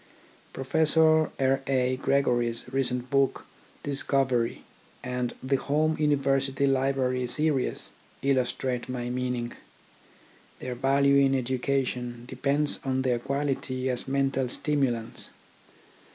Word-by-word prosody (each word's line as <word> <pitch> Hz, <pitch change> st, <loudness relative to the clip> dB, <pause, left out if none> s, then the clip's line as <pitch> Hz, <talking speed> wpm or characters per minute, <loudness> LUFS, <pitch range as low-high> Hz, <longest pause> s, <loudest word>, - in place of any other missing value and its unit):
Prof. 150 Hz, +4 st, 0 dB
R. 155 Hz, -4 st, +3 dB
A. 130 Hz, -1 st, +2 dB
Gregory's 120 Hz, -4 st, +1 dB
recent 125 Hz, -2 st, -1 dB
book, 140 Hz, -1 st, +1 dB, 0.4 s
Discovery, 135 Hz, -4 st, 0 dB, 0.4 s
and 125 Hz, -1 st, -2 dB
the 135 Hz, +1 st, +2 dB
Home 155 Hz, +3 st, +1 dB
University 140 Hz, -2 st, +2 dB
Library 130 Hz, -2 st, +1 dB
series 150 Hz, 0 st, 0 dB, 0.3 s
illustrate 130 Hz, -2 st, 0 dB
my 125 Hz, -1 st, -3 dB
meaning. 125 Hz, -1 st, -2 dB, 1.0 s
Their 125 Hz, -, -5 dB
value 140 Hz, +2 st, +3 dB
in 135 Hz, -1 st, +4 dB
education 125 Hz, -1 st, -1 dB
depends 140 Hz, +4 st, -1 dB
on 130 Hz, -1 st, 0 dB
their 125 Hz, -2 st, +1 dB
quality 135 Hz, -1 st, -1 dB
as 125 Hz, +1 st, -4 dB
mental 135 Hz, -1 st, 0 dB
stimulants. 130 Hz, -5 st, -1 dB
135 Hz, 100 wpm, -27 LUFS, 125-140 Hz, 1.0 s, in